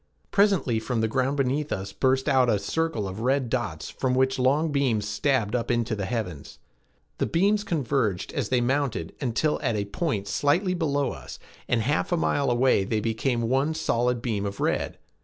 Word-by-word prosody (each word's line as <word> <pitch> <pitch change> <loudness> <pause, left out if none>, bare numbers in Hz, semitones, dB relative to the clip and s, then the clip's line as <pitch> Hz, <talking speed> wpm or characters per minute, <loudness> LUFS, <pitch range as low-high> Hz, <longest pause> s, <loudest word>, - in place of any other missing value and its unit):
Presently 195 - +3
from 115 +1 -2
the 110 - +2
ground 130 +4 0
beneath 140 +3 0
us 95 +1 -3
burst 130 +1 +1
out 130 -3 +4
a 105 - +3
circle 160 -2 -1
of 95 +2 -6
red 130 0 0
dots - - -2
from 130 -1 -1
which 130 0 +2
long 145 +5 +2
beams 125 -7 +1
stabbed 110 +1 0
up 120 - -2
into 120 -1 0
the 100 -2 -3
heavens. 90 - -4 0.6
The - - +1
beams 205 +4 +2
converged 135 - -1
as 130 -8 -2
they 125 -1 +2
mounted 125 - -1
until 140 +4 0
at 120 -6 0
a 100 -1 -1
point 100 - -2
slightly 170 - +1
below 145 -6 0
us, 70 - -9 0.3
and 120 -2 +2
a - - -2
half 145 +9 0
mile 145 -5 +1
away 120 -4 +3
they 105 +3 -1
became 115 +2 -1
one 135 +6 +1
solid 125 -5 0
beam 110 -5 -1
of 100 0 -4
red. - - -1
125 Hz, 185 wpm, -26 LUFS, 110-145 Hz, 0.6 s, out